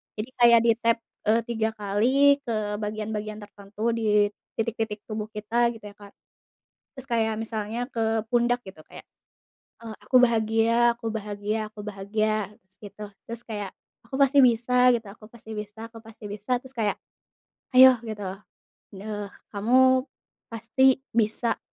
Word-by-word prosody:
Jadi 215 +4 -5
kayak 235 -1 +7
ditap, 230 0 +2 0.3
eee, 225 +2 +4
3 225 -1 -1
kali, 250 +8 +3
ke 215 -2 -2
bagian-bagian 215 0 -4
tertentu 205 +3 -4
di 210 -2 +2 0.2
titik-titik 225 -2 -3
tubuh 215 -1 -5
kita 230 +3 +1
gitu 225 - -14
ya, 205 - -22
Kak. 205 -1 -14 0.8
Terus 265 -1 -10
kayak 220 -2 +1
misalnya 225 +3 -4
ke 225 -1 0
pundak 245 0 +2
gitu, 190 -4 -12
kayak, - - -12 0.8
eee, 220 - -7
aku 255 - +1
bahagia 230 0 +3
aku 230 - -7
bahagia 210 0 -3
aku 215 - -11
bahagia, 210 +1 -2
terus 190 0 -26
gitu. 205 +1 -9 0.2
Terus 235 +1 -7
kayak 205 -3 -5 0.4
aku 265 +3 -4
pasti 275 +1 +4
bisa 250 +1 +4
gitu, 230 -2 -3
aku 215 +1 -14
pasti 225 -1 -15
bisa 210 +2 -7
aku 225 - -12
pasti 225 -1 -15
bisa, 210 +5 -2
terus 260 +1 -15
kayak, 220 -4 -1 0.8
ayo 260 0 +9
gitu, 215 -3 -6 0.7
eee, 205 +1 -5 0.2
kamu 255 +5 +3 0.4
pasti 260 +4 +2
bisa, 230 +1 0
220 Hz, 145 wpm, -25 LUFS, 210-235 Hz, 0.8 s, ayo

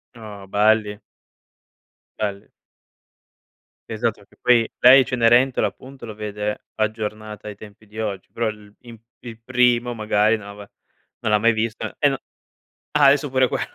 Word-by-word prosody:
Oh, 105 -4 -10
belli. 105 +1 +2 1.2
Belli. 100 -2 -4 1.4
Esatto 110 -1 -2
che - - -27
poi, 120 -2 +3
lei 130 +2 +8
Cenerentola 125 +1 +3
appunto 130 -2 -8
lo 110 - -7
vede 105 0 -5
aggiornata 110 -1 -4
ai 105 - -7
tempi 105 0 -15
di 110 +2 -10
oggi, 100 -4 -4
però 115 -1 -2
il 105 -1 -11
in 120 -2 -12 0.3
il 115 -2 -10
primo 125 -1 +2
magari 110 0 +2
non 105 - -12
l'avea 100 0 -11 0.5
non 110 - -1
l'ha 105 - +4
mai 115 +2 +3
visto. 110 0 -3
E 145 - +3
no 135 - -3 0.8
ah, 145 - +5
adesso 140 0 +3
pure 130 -1 +2
quello, - - -2
110 Hz, 150 wpm, -22 LUFS, 105-120 Hz, 1.4 s, lei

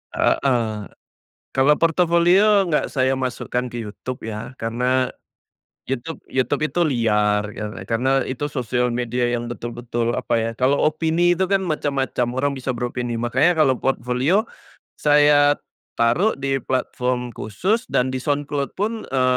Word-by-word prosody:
Heeh. 115 -6 +1 0.7
Kalau 135 +2 +4
portofolio 180 +4 +4
nggak 155 -3 0
saya 130 -1 +1
masukkan 125 -1 -3
ke 120 - -5
YouTube 125 +3 -7
ya, 110 +2 -6
karena, 125 +3 0 0.8
YouTube 135 +5 -5
YouTube 135 +3 0
itu 175 - -1
liar 105 -5 +2 0.2
kar 105 0 -5 0.2
karena 130 +3 +2
itu 135 +3 -3
sosial 125 -3 -1
media 120 0 -1
yang 120 0 -3
betul-betul, 120 0 -3
apa 125 -2 -1
ya, 115 0 -1
kalau 130 +3 +2
opini 165 +3 +2
itu 190 - +1
kan 195 -1 +3
macam-macam, 140 -7 -1
orang 140 +1 +1
bisa 130 0 -2
beropini. 120 0 -3
Makanya 135 +8 +3
kalau 130 -4 +4
portofolio, 135 - +1 0.5
saya 145 -1 +4 0.4
taruh 135 - +3
di 135 0 0
platform 125 -1 -1
khusus 190 - -1
dan 125 +1 +2
di - - 0
SoundCloud 145 -1 -1
pun, 220 +3 -2
e 130 -1 -1
130 Hz, 135 wpm, -22 LUFS, 120-150 Hz, 0.8 s, Kalau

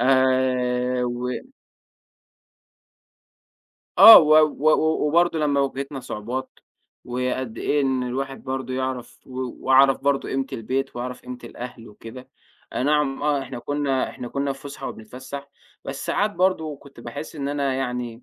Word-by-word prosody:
آآ، 125 -1 +2
و 120 +1 -3 2.7
آه 225 - +12
و 155 -1 +4
و 155 0 +3
و 160 -1 +2
وبرضه 170 +1 +2
لمّا 145 -2 +1
واجهتنا 135 0 -3
صعوبات، 125 +2 -5 0.5
وقد 125 -1 -3
إيه 145 - +1
إن 130 -2 0
الواحد 135 +2 -4
برضه 130 -1 -4
يعرف 130 -2 -4
و 130 0 -8 0.3
وعرف 135 0 +5
برضه 140 -1 0
قيمة 135 0 -1
البيت 130 +3 -3
وعرف 125 +1 -5
قيمة 125 0 -8
الأهل 120 -1 -9
وكده. 115 +4 -11 0.5
أي - - -1
نعم 145 -1 +1
آه 145 -2 +1
إحنا 130 -2 -7
كنا 140 0 -1
إحنا 120 - -8
كنا 140 +1 -2
في 135 - -13
فسحه 140 -1 -7
وبنتفسّح، 130 +5 -9 0.4
بس 135 - -6
ساعات 210 +1 +1
برضه 175 -5 0
كنت 140 -3 -16
باحس 120 +7 -8
إن 140 -1 -3
أنا 140 -2 -1
يعني 125 -2 -4
135 Hz, 140 wpm, -23 LUFS, 125-140 Hz, 2.7 s, آه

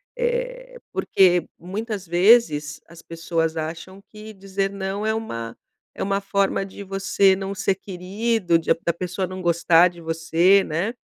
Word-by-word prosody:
eh - - -3
porque 180 -2 +3
muitas 200 +2 -5
vezes 175 -5 +3
as 170 0 -14
pessoas 165 -1 -2
acham 165 +5 -6
que 215 0 -11
dizer 195 0 -3
não 200 +1 -4
é 220 - +1
uma 115 - -5 0.4
é - - -4
uma 195 0 0
forma 195 0 0
de 195 +1 -10
você 195 0 +2
não 195 +1 -5
ser 190 - 0
querido, 190 0 -1
de 165 - +2
da 170 - +2
pessoa 180 +2 -3
não 185 +1 -7
gostar 170 0 +4
de 175 -1 -14
você, 165 +4 +3
né. 175 +9 -2
190 Hz, 150 wpm, -23 LUFS, 170-200 Hz, 0.4 s, gostar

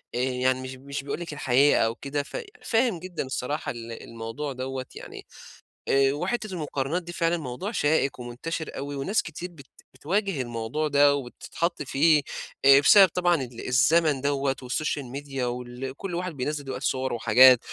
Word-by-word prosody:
آآ - - -1
يعني 130 0 +1
مش 130 0 -6
مش 140 +1 -6
بيقول 140 - -4
لِك 170 -3 -6
الحقيقة 140 0 +3
أو 115 0 +1
كده، 140 +3 -3
ف - - -7 0.3
فاهم 225 -5 +1
جدًا 180 0 -5
الصراحة 130 +3 -3
ال 115 -1 -8
الموضوع 115 +6 -5
دوّة، 130 0 -4
يعني - - -9 0.6
آآ 135 0 +4
وحتّة 215 +8 -2
المقارنات 150 0 -2
دي 175 0 -8
فعلًا 170 0 +1
موضوع 155 - -5
شائِك 145 - +1
ومُنتَشر 125 +7 -5
أوي 140 +1 -5
وناس 185 +11 0
كتير 170 +3 -7
بت 140 -5 -14 0.3
بتواجه 195 -1 -1
الموضوع 120 +6 -2
ده 145 0 +5
وبتتحطّي 150 +5 -3
فيه، 150 +3 +4 0.4
آآ 135 0 +8
بسبب 190 +7 +8
طبعًا 175 +1 +2
ال 125 -6 -4
الزمن 140 +3 +3
دوّة 140 -1 0
والSocial 145 +3 -1
media 140 -1 -5
وال 125 +2 -4
كلّ 190 0 -5
واحد 180 +1 -3
بينزّل 145 +3 -3
دلوقتي 135 - -4
صِوَرُه 130 -1 -1
وحاجات، 125 +3 +7
140 Hz, 165 wpm, -26 LUFS, 130-165 Hz, 0.6 s, آآ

